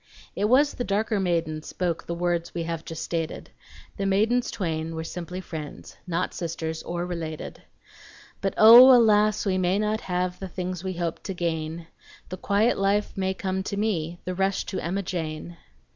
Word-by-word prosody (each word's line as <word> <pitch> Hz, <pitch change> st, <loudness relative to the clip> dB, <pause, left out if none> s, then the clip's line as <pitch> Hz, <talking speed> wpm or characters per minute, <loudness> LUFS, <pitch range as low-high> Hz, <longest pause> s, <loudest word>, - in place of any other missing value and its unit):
(It 205 Hz, -, 0 dB
was 275 Hz, +6 st, +4 dB
the 245 Hz, -, -3 dB
darker 210 Hz, 0 st, 0 dB
maiden 165 Hz, -4 st, -1 dB
spoke 170 Hz, +1 st, -3 dB
The 170 Hz, -, -3 dB
words 175 Hz, -1 st, -1 dB
we 170 Hz, -, -1 dB
just 165 Hz, -1 st, -5 dB
have 165 Hz, -, -6 dB
stated; 165 Hz, 0 st, -4 dB, 0.5 s
The 195 Hz, -, -1 dB
maidens 225 Hz, +6 st, +2 dB
twain 165 Hz, -6 st, -3 dB
were 160 Hz, -, -3 dB
simply 180 Hz, +2 st, -6 dB
friends, 155 Hz, -5 st, -8 dB
Not 180 Hz, +1 st, -1 dB
sisters, 160 Hz, -1 st, -4 dB
or 175 Hz, 0 st, -3 dB
related.) 165 Hz, -3 st, -6 dB, 0.8 s
But 195 Hz, -1 st, -1 dB
O! 235 Hz, +4 st, +10 dB
alas! 215 Hz, -2 st, +3 dB
we 185 Hz, -2 st, +1 dB
may 185 Hz, +1 st, +2 dB
not 215 Hz, +1 st, 0 dB
have 180 Hz, 0 st, -2 dB
The 190 Hz, -, -5 dB
things 180 Hz, 0 st, -4 dB
we 190 Hz, -1 st, -3 dB
hope 170 Hz, -2 st, -3 dB
to 190 Hz, -, -5 dB
gain. 165 Hz, -1 st, -3 dB, 0.4 s
The 185 Hz, -, -5 dB
quiet 205 Hz, +5 st, +1 dB
life 200 Hz, +1 st, +1 dB
may 190 Hz, -1 st, -1 dB
come 190 Hz, 0 st, -2 dB
to 200 Hz, +1 st, -4 dB
me, 175 Hz, -6 st, -1 dB
The 185 Hz, -, -2 dB
rush 195 Hz, +1 st, 0 dB
to -, -, -1 dB
Emma 190 Hz, +4 st, -2 dB
Jane! 170 Hz, -1 st, -5 dB
180 Hz, 175 wpm, -25 LUFS, 170-200 Hz, 0.8 s, O